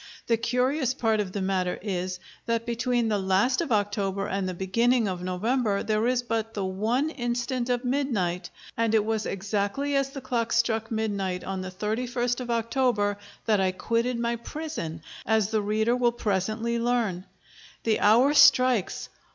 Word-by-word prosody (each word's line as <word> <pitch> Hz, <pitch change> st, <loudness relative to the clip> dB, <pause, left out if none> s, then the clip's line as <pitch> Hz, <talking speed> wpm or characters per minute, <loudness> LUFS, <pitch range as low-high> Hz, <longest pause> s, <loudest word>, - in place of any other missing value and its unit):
The 230 Hz, -, +3 dB
curious 250 Hz, +3 st, 0 dB
part 220 Hz, -2 st, +1 dB
of 200 Hz, -3 st, -2 dB
the 195 Hz, 0 st, -3 dB
matter 185 Hz, -2 st, 0 dB
is, 185 Hz, -2 st, -3 dB, 0.3 s
that 230 Hz, 0 st, 0 dB
between 240 Hz, 0 st, 0 dB
the 210 Hz, -2 st, +1 dB
last 195 Hz, -, +2 dB
of 325 Hz, -, -3 dB
October 200 Hz, -2 st, 0 dB
and 195 Hz, -1 st, -2 dB
the 180 Hz, -, -4 dB
beginning 230 Hz, +6 st, +2 dB
of 180 Hz, -2 st, -3 dB
November 205 Hz, +4 st, 0 dB
there 215 Hz, +1 st, +1 dB
is 250 Hz, -1 st, +1 dB
but 225 Hz, -1 st, -2 dB
the 200 Hz, -2 st, -1 dB
one 225 Hz, +11 st, 0 dB
instant 245 Hz, -1 st, -2 dB
of 245 Hz, +1 st, 0 dB
midnight; 200 Hz, -10 st, -1 dB, 0.3 s
and 225 Hz, -1 st, +1 dB
it 210 Hz, -1 st, +3 dB
was 220 Hz, -1 st, -1 dB
exactly 205 Hz, +8 st, -1 dB
as 275 Hz, 0 st, +1 dB
the 275 Hz, -, -7 dB
clock 240 Hz, -3 st, -1 dB
struck 225 Hz, -1 st, +1 dB
midnight 200 Hz, -5 st, -2 dB
on 190 Hz, -1 st, -4 dB
the 185 Hz, -, -5 dB
31st 240 Hz, +5 st, -2 dB
of 250 Hz, -1 st, -6 dB
October 230 Hz, -3 st, +1 dB, 0.3 s
that 215 Hz, -3 st, +3 dB
I 185 Hz, -1 st, +1 dB
quitted 235 Hz, +5 st, 0 dB
my 235 Hz, 0 st, 0 dB
prison, 235 Hz, -, -6 dB, 0.2 s
as 220 Hz, -2 st, +1 dB
the 220 Hz, -1 st, +1 dB
reader 220 Hz, +3 st, +1 dB
will 245 Hz, -1 st, +2 dB
presently 220 Hz, +2 st, -1 dB
learn.... 230 Hz, -7 st, 0 dB, 0.6 s
The 220 Hz, -2 st, +2 dB
hour 240 Hz, +7 st, +5 dB
strikes. 255 Hz, -7 st, +4 dB
225 Hz, 170 wpm, -26 LUFS, 200-245 Hz, 0.6 s, hour